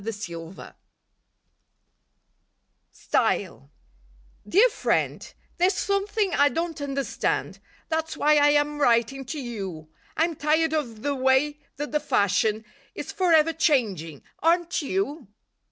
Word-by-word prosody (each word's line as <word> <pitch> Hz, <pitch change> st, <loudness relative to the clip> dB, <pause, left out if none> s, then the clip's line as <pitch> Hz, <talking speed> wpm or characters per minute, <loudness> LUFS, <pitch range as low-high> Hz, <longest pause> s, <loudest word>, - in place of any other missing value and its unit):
TO -, -, -11 dB, 0.3 s
LIFE 165 Hz, +3 st, -11 dB
WAVES -, -, -11 dB, 2.2 s
STYLE 70 Hz, -, -1 dB, 0.8 s
Dear 420 Hz, -, +6 dB
Friend: -, -, -1 dB, 0.2 s
There's 370 Hz, +2 st, +2 dB
something 400 Hz, 0 st, 0 dB
I 285 Hz, 0 st, +4 dB
don't 330 Hz, +2 st, -3 dB
understand, 275 Hz, -1 st, -2 dB, 0.3 s
That's 320 Hz, 0 st, -2 dB
why 300 Hz, 0 st, +4 dB
I 290 Hz, 0 st, +5 dB
am 295 Hz, 0 st, +1 dB
writing 245 Hz, +1 st, +2 dB
to 300 Hz, +4 st, -5 dB
you; 195 Hz, -, -6 dB, 0.3 s
I'm 330 Hz, +1 st, +1 dB
tired 315 Hz, +2 st, +1 dB
of 235 Hz, -9 st, -3 dB
the 285 Hz, -, 0 dB
way 265 Hz, +3 st, +2 dB, 0.2 s
that 295 Hz, +1 st, -5 dB
"the 300 Hz, -, +1 dB
fashion" 215 Hz, -4 st, +1 dB, 0.3 s
Is -, -, -6 dB
forever 330 Hz, -4 st, +3 dB
changing, 205 Hz, -, 0 dB, 0.2 s
aren't 340 Hz, +1 st, +2 dB
you? 305 Hz, -, -3 dB
290 Hz, 120 wpm, -25 LUFS, 240-325 Hz, 2.2 s, Dear